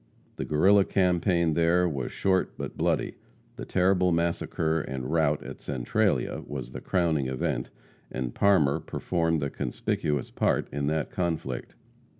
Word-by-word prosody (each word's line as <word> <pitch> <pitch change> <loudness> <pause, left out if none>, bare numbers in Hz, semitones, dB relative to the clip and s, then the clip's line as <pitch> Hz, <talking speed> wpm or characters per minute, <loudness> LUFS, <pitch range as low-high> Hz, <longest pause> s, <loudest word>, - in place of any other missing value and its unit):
The - - -3
Guerrilla 95 +7 +5
campaign 90 -3 +2
there 85 +2 +3
was 70 -6 -3
short 95 -1 0
but - - -5
bloody. - - 0 0.4
The - - -6
terrible 90 0 +2
massacre 85 -1 0
and 65 -1 -5
rout 80 -3 +2
at - - -9
Centralia 65 -4 0
was 65 -4 -6
the - - -7
crowning 80 -7 +1
event, 65 -1 -2 0.4
and 65 -1 -3
Parmer 85 -9 +3
performed 80 -3 -1
a 70 - -2
conspicuous 70 +2 -2
part - - +1
in 70 0 -2
that 80 0 -1
conflict. 80 -8 -3
80 Hz, 140 wpm, -27 LUFS, 70-90 Hz, 0.4 s, Guerrilla